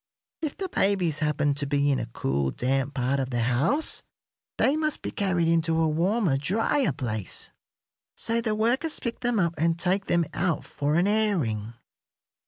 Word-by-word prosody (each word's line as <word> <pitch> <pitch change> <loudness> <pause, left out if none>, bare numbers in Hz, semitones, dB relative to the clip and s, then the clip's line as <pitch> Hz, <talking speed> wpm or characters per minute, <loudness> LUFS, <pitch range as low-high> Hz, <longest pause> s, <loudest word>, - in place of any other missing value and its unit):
If 310 -3 -3
the 385 - -3
babies 185 - +1
happen 150 -1 +1
to 145 0 -3
be 145 0 +2
in 135 - +1
a 120 - -4
cool, 70 - -1
damp 135 - -1
part 130 +1 0
of 130 -1 -2
the 120 -2 -1
house 140 - 0 0.6
they 275 - +3
must 310 -1 -1
be - - -3
carried 175 -4 0
into 165 0 +2
a 160 - +3
warmer, 170 - +1
drier 220 - +1
place. 110 -7 -4 0.6
So 230 +1 0
the 220 -2 -1
workers 250 +9 0
pick 235 -1 -4
them 240 -3 0
up 170 -2 +1
and 165 +1 +2
take 190 +3 +1
them 170 -1 +2
out 170 -3 -1
for 145 +1 -1
an 175 +2 +3
airing. 160 - 0
165 Hz, 175 wpm, -26 LUFS, 135-215 Hz, 0.6 s, they